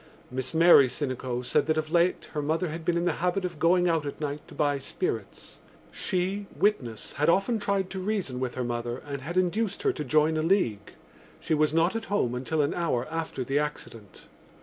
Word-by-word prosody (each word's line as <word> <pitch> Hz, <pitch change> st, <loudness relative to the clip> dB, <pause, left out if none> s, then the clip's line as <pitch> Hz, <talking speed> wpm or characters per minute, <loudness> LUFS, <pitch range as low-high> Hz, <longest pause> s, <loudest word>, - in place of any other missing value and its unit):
Miss 130 Hz, +3 st, -3 dB
Mary 165 Hz, -5 st, +7 dB
Sinico 125 Hz, -2 st, -3 dB
said -, -, +1 dB
that 155 Hz, 0 st, +1 dB
of 155 Hz, 0 st, -2 dB
late 175 Hz, +1 st, +1 dB
her 150 Hz, -, -1 dB
mother 160 Hz, +4 st, 0 dB
had 165 Hz, +1 st, -6 dB
been 170 Hz, +1 st, +1 dB
in 170 Hz, -, 0 dB
the 175 Hz, -, +3 dB
habit 180 Hz, +1 st, 0 dB
of 175 Hz, -4 st, -5 dB
going 180 Hz, +1 st, +4 dB
out 165 Hz, -3 st, +1 dB
at 145 Hz, -, -6 dB
night 150 Hz, -1 st, -3 dB
to -, -, -13 dB
buy 145 Hz, -2 st, +1 dB
spirits. 370 Hz, -, -5 dB, 0.3 s
She, 190 Hz, +2 st, -2 dB
witness, 125 Hz, -, 0 dB
had 150 Hz, +3 st, +1 dB
often 195 Hz, +6 st, +2 dB
tried 200 Hz, -2 st, -1 dB
to 190 Hz, -, -4 dB
reason 185 Hz, -10 st, -2 dB
with 130 Hz, -1 st, -3 dB
her 125 Hz, -, -2 dB
mother 120 Hz, 0 st, -3 dB
and 140 Hz, -2 st, -5 dB
had 170 Hz, +7 st, -5 dB
induced 185 Hz, +3 st, 0 dB
her -, -, +2 dB
to 150 Hz, -, -4 dB
join 155 Hz, +3 st, +2 dB
a -, -, +1 dB
league. 155 Hz, -, 0 dB, 0.5 s
She -, -, -2 dB
was 155 Hz, -1 st, +3 dB
not 165 Hz, +5 st, +2 dB
at 225 Hz, 0 st, -3 dB
home 165 Hz, -12 st, 0 dB
until 140 Hz, +5 st, 0 dB
an 145 Hz, -, 0 dB
hour 145 Hz, -8 st, -1 dB
after 165 Hz, -5 st, -3 dB
the 135 Hz, +4 st, 0 dB
accident. 115 Hz, -8 st, -6 dB
155 Hz, 210 wpm, -27 LUFS, 135-180 Hz, 0.5 s, Mary